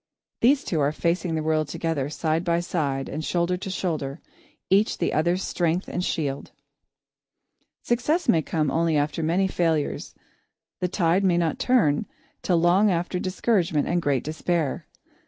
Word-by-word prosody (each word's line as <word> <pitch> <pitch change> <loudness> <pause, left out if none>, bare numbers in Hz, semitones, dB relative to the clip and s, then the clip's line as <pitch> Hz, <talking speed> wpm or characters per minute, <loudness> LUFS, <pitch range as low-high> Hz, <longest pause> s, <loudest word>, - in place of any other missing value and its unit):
These 275 +4 +4
two 165 - -1
are 145 0 +2
facing 170 +1 -1
the 155 - -1
world 155 -1 +1
together, 145 -2 -2
side 160 +1 -1
by 170 -1 +1
side 145 -6 -2
and 155 +2 -5
shoulder 175 +2 0
to 190 - -6
shoulder, 160 -6 -3 0.5
each 200 +3 +3
the - - -1
other's 175 +5 +1
strength 175 +1 -1
and 180 - -3
shield. 140 -6 -2 1.3
Success 295 +9 0
may 160 - +4
come 155 -2 -1
only 165 -1 +1
after 145 +3 -1
many 175 +5 +1
failures; 165 -5 -1 0.6
the 180 - 0
tide 180 +1 +1
may 180 -3 +3
not 165 -2 0
turn 195 - +2 0.3
till 175 -2 +2
after 180 -1 +3
long - - -5
discouragement 185 -5 0
and 175 0 +1
great 140 -5 0
despair. 160 -1 -2
170 Hz, 155 wpm, -25 LUFS, 155-180 Hz, 1.3 s, These